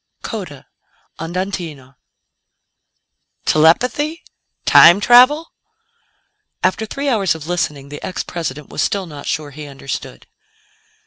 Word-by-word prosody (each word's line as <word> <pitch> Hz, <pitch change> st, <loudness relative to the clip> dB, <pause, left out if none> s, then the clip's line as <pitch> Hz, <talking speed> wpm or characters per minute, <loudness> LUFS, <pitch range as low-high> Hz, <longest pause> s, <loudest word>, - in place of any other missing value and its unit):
CODA -, -, -7 dB, 0.5 s
ANDANTINO 165 Hz, -6 st, -5 dB, 1.5 s
"Telepathy? 250 Hz, -, +2 dB, 0.4 s
Time 175 Hz, +4 st, +8 dB
travel?" 255 Hz, +9 st, +5 dB, 1.1 s
After 220 Hz, +4 st, 0 dB
three 280 Hz, +5 st, -4 dB
hours 200 Hz, -, +1 dB
of 155 Hz, -2 st, -9 dB
listening, 150 Hz, -5 st, -3 dB
the 145 Hz, -, -9 dB
ex 185 Hz, -, -4 dB
President 150 Hz, -4 st, -5 dB
was -, -, -3 dB
still 200 Hz, -3 st, -1 dB
not 150 Hz, -4 st, -10 dB
sure 150 Hz, -2 st, -3 dB
he 150 Hz, +2 st, -9 dB
understood. 135 Hz, -1 st, -7 dB
170 Hz, 105 wpm, -18 LUFS, 150-220 Hz, 1.5 s, Time